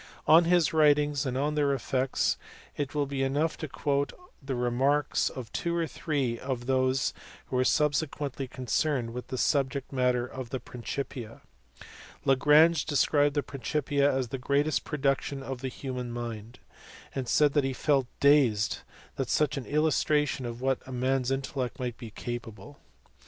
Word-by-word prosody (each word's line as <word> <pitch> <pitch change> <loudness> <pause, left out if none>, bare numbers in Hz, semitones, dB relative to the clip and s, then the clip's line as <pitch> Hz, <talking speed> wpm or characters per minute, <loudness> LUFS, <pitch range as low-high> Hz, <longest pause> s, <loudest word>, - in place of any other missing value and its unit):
On 165 +2 +7
his 170 -3 +3
writings 150 -2 +3
and 130 0 -2
on 145 +2 0
their 145 -2 +2
effects, 130 0 0 0.4
it 145 0 -3
will 145 -1 +1
be 140 -1 -3
enough 145 +4 +1
to 155 - -5
quote 140 0 -1 0.3
the 135 -1 -3
remarks 130 +4 +1
of 125 -4 -8
two 170 0 -2
or 170 -1 +1
three 140 -7 -2
of 130 -2 -4
those 130 0 +1 0.3
who - - -5
were 130 - +3
subsequently 145 -2 0
concerned 130 -1 -1
with 125 0 -6
the 130 - -4
subject 140 0 0
matter 125 -2 +2
of 130 -1 -7
the 130 - -3
Principia. 125 0 -6 0.8
Lagrange 150 +4 +5
described 145 -1 +2
the 145 - +1
Principia 140 +2 0
as 130 -2 -1
the 135 - -4
greatest 145 +3 +1
production 140 -1 -1
of 130 -2 -5
the 135 - -2
human 125 -2 -5
mind, 120 -1 -6 0.6
and 130 -2 -3
said 150 -1 +3
he 135 - 0
felt 135 0 +1
dazed 135 -8 +4 0.4
at - - -1
such 150 0 +2
an 135 -3 -5
illustration 150 -3 +1
of 120 +1 -7
what 130 0 -1
man 130 +1 +1
s 125 - -2
intellect 135 -1 -2
might 125 -2 -3
be 115 - -7
capable. 120 +2 -7
135 Hz, 155 wpm, -28 LUFS, 125-145 Hz, 0.8 s, On